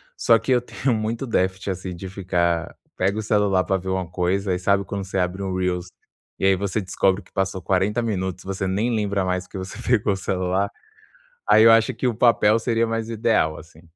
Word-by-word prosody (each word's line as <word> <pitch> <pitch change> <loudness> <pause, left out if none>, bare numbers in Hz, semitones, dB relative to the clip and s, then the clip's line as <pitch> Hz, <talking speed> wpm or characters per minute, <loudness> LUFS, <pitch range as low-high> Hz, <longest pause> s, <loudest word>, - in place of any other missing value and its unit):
só 115 - +4
que 115 +4 -3
eu 125 -1 +4
tenho 130 +1 -2
muito 110 +3 -2
déficit 95 -4 -1
assim, 90 -1 -5
de 95 +2 -7
ficar 85 -3 -1 0.2
pega 95 +3 0
o 110 - -1
celular 100 -3 +2
pra 95 - 0
ver 95 0 -6
uma 95 -2 -1
coisa 90 +2 0
e, - - -1
sabe, 100 +1 +2
quando 100 +2 -4
você 95 - -4
abre 90 +2 -1
um 95 -1 -3
Reels, 90 -1 -1 0.5
e - - 0
aí 95 - +5
você 100 +3 -2
descobre 95 +1 +1
que - - -25
passou 95 -1 -2
40 95 +5 +1
minutos. 95 -4 -3
Você 95 0 -3
nem 105 +6 0
lembra 100 -2 0
mais 90 0 -1
porque 95 - -9
você 95 +1 -7
pegou 110 -4 +2
o - - -2
celular. 95 +1 -1 0.8
Aí 110 - +6
eu 115 - +8
acho 115 +3 +4
que 120 +3 -4
o 120 - +1
papel 115 -2 +4
seria 115 0 +1
mais 115 0 -3
ideal, 110 -8 +1
assim. 80 0 -14
95 Hz, 215 wpm, -23 LUFS, 95-110 Hz, 0.8 s, eu